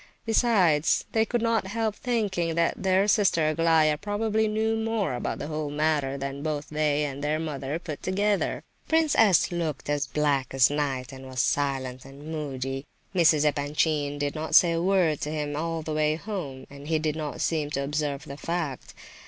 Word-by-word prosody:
Besides, 195 -10 +3
they 220 0 +2
could 240 0 -1
not 230 -4 +1
help 220 +1 -1
thinking 200 -10 -1
that 170 +2 0
their 190 +1 +3
sister 185 -7 +3
Aglaya 155 -1 +3
probably 215 +1 0
knew 220 +1 0
more 220 - -1
about 120 - -3
the - - -5
whole 155 -1 -3
matter 145 -2 0
than 140 0 -5
both 150 -1 -3
they 150 -1 +1
and 140 -1 -4
their 150 +1 +1
mother 150 -2 -3
put 165 -4 -7
together. 200 +1 0 0.2
Prince 320 -2 +3
S. 200 -7 +4
looked 160 -5 -3
as 145 -2 0
black 140 -1 0
as 130 +1 +5
night, 135 -4 -2
and 130 0 -10
was 130 -1 -6
silent 135 -3 -1
and 140 +3 -10
moody. 135 -3 -4 0.3
Mrs. 160 -4 +4
Epanchin 145 0 0
did 145 0 -1
not 160 0 -2
say 175 - +7
a 165 0 0
word 180 -5 +2
to 150 - -2
him 150 -1 -3
all 165 +1 -2
the 155 - -4
way 155 0 +2
home, 160 -9 -6
and 140 +1 -11
he 160 0 +2
did 155 -1 -1
not 155 -2 -5
seem 155 -3 0
to 140 -1 -2
observe 145 0 -2
the 140 -1 -8
fact. 165 -5 -4
155 Hz, 185 wpm, -26 LUFS, 145-185 Hz, 0.3 s, say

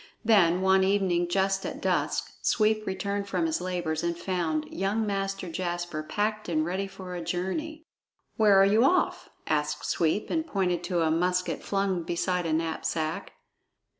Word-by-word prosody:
Then, 185 -5 +4
one 190 0 +4
evening 190 -3 +2
just 195 +1 +1
at - - -5
dusk, - - 0
Sweep 215 -1 +2
returned 200 +1 -2
from 330 - 0
his 320 0 -1
labors 175 -4 -2
and 170 0 -1
found 170 -4 -1
young 200 +4 0
Master 195 -2 -2
Jasper 175 -2 -3
packed 210 +6 -2
and 155 -2 +1
ready 190 +3 -2
for 190 -2 -9
a 175 - -4
journey. 300 - -3 0.5
"Where 205 -3 +5
are 195 - +7
you 215 +4 +4
off?" 360 +6 +2 0.2
asked 150 -1 -1
Sweep, 165 +5 0
and 320 0 0
pointed 180 - 0
to 175 -2 0
a 160 - +2
musket 180 +2 0
flung 195 -3 0
beside 175 +1 -1
a 160 - 0
knapsack. 160 0 -2
185 Hz, 160 wpm, -27 LUFS, 170-200 Hz, 0.5 s, are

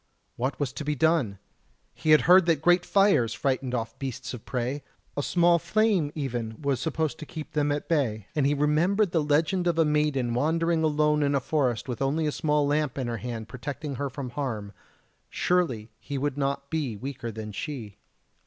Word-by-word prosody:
What 130 +3 -2
was 140 -3 -1
to - - -5
be 150 0 -1
done? 150 -9 +2 0.6
He 125 +7 -4
had 155 -1 +7
heard 180 0 +6
that 160 -3 +2
great 175 +1 +4
fires 195 - +3
frightened 130 0 -1
off 115 -1 -4
beasts 130 -2 -5
of 120 - -8
prey 130 +3 -2 0.3
a 145 - 0
small 170 +2 +3
flame 205 -7 +1
even 120 -6 -3
was 140 -4 0
supposed 160 +1 -2
to 155 - -7
keep 155 -2 -7
them 145 -1 +1
at 145 0 -2
bay; 120 - 0
and 145 -3 +2
he 145 - +2
remembered 165 +7 +2
the 165 - +2
legend 160 +5 +1
of 170 -2 +1
a 165 - +4
maiden 150 -5 +1
wandering 165 +5 +1
alone 150 -1 +2
in 140 -1 +2
a - - +3
forest 130 -4 0
with 125 -1 -4
only 145 +4 +1
a 150 - +1
small 150 -1 +1
lamp 145 -2 0
in 130 - -1
her 120 -1 -2
hand 115 -1 -5
protecting 140 +3 -5
her 140 +1 -2
from 130 -1 -6
harm, 110 -7 -4 0.6
surely 130 -12 0
he 140 -1 -5
would 145 0 -1
not 140 0 -2
be 145 -9 -2
weaker 125 0 -5
than 110 -1 -6
she. 110 -4 -6
145 Hz, 195 wpm, -27 LUFS, 125-155 Hz, 0.6 s, had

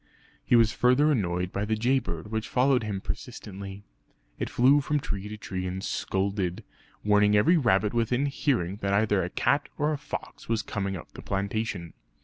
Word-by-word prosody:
He - - +3
was 115 -2 +5
further 125 +5 +4
annoyed 90 -7 0
by 100 - -2
the 110 +1 0
jay 125 +5 +2
bird 85 -1 -6
which 110 0 -2
followed 130 0 +3
him 105 -3 -3
persistently. 100 -3 -7 0.6
It - - -2
flew 135 +4 +5
from 150 +2 0
tree 100 -6 -4
to 105 - -6
tree 95 -3 -4
and 95 +1 -4
scolded, 95 -2 -1 0.4
warning 105 0 +4
every 165 +12 +5
rabbit 105 -7 +2
within 120 +3 +1
hearing 125 - 0
that 100 -1 -1
either 105 -2 +2
a 90 - -3
cat 140 +9 +1
or 150 +1 +1
a 145 - -3
fox 150 - -7
was 115 -1 +1
coming 95 -2 -3
up 80 - -11
the - - -10
plantation. 100 -3 -3
105 Hz, 180 wpm, -27 LUFS, 95-125 Hz, 0.6 s, was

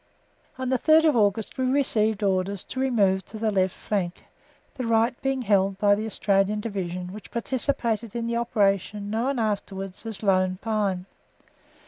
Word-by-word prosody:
On 260 -1 -3
the 260 -1 +1
third 315 +3 +5
of 305 -4 +4
August 210 +2 +1
we 260 - +1
received 220 -6 +1
orders 190 0 0
to 260 - -6
remove 205 -8 +2
to 220 - -9
the 220 0 0
left 190 -2 +1
flank, 185 -4 -3 0.5
the 255 -3 -4
right 230 +2 +3
being 270 -1 -1
held 195 -2 +2
by 205 0 +4
the 215 +2 -1
Australian 200 0 +1
Division 185 -4 -4
which 210 - -10
participated 235 -3 -2
in 235 -1 -2
the 235 0 -1
operation 205 -3 0
known 245 +5 0
afterwards 195 -3 -3
as 220 -1 -6
Lone 185 -2 +2
Pine. 205 -5 -1
210 Hz, 160 wpm, -25 LUFS, 195-235 Hz, 0.5 s, third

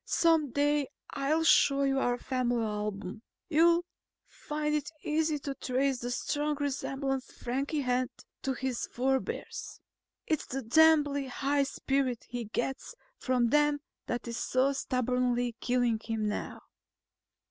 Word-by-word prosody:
Some 325 -4 +3
day 290 +2 +1 0.2
I'll 300 +4 +1
show 280 -3 +5
you 270 -1 +2
our 245 -2 +1
family 245 -2 0
album. 210 -1 -4 0.3
You'll 340 +2 +4 0.4
find 300 0 -3
it 300 -1 -1
easy 310 0 +1
to 280 0 -4
trace 265 0 0
the 245 - -4
strong 295 +4 -1
resemblance 270 -1 -2
Frankie 275 +5 -2
has 250 -1 +1 0.3
to 270 - -1
his 260 -1 -3
forebears. 265 +2 -2 0.5
Its 310 -3 -1
the 270 +1 -4
damnably 290 +1 +4
high 280 +3 0
spirit 270 -2 -1
he 240 -1 -4
gets 265 - -3 0.2
from 250 -2 +2
them 295 +2 +3 0.3
that 240 0 -3
is 235 0 -4
so 260 +2 +2
stubbornly 250 -2 0
killing 245 -2 +1
him 220 -2 -1
now." 210 - -4
270 Hz, 130 wpm, -30 LUFS, 245-290 Hz, 0.5 s, show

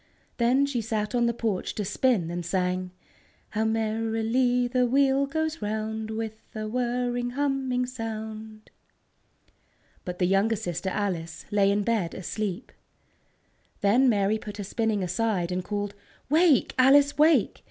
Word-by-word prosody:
Then 250 +4 +3
she 270 -4 -2
sat 215 -1 -2
on 240 -1 +2
the - - +2
porch 220 -5 -2
to 210 - -2
spin, 205 -4 +1
and 175 0 -3
sang: 180 +1 -1 0.6
"How 220 +1 -1
merrily 225 +3 +1
the 250 0 +1
wheel 275 +2 +3
goes 315 +1 -2
round, 220 +1 -3
With 220 0 -5
a 215 0 -3
whirring, 245 +1 -1
humming 270 -2 0
sound!" 220 -3 -7 1.3
But 180 -1 -5
the 180 - +1
younger 195 +5 +2
sister, 180 -1 -3
Alice, 185 -5 -3
lay 200 -1 +3
in 205 +1 +1
bed 210 -6 -1
asleep. 200 +3 -4 1.1
Then 240 +6 +4
Mary 205 0 +2
put 210 -1 -8
her 205 - -4
spinning 215 0 -1
aside, 180 -1 -1
and 180 0 -2
called: 205 +1 -3 0.4
"Wake, 320 -2 +4
Alice, 285 +3 +5
wake! 315 +2 +4
220 Hz, 140 wpm, -26 LUFS, 200-250 Hz, 1.3 s, Alice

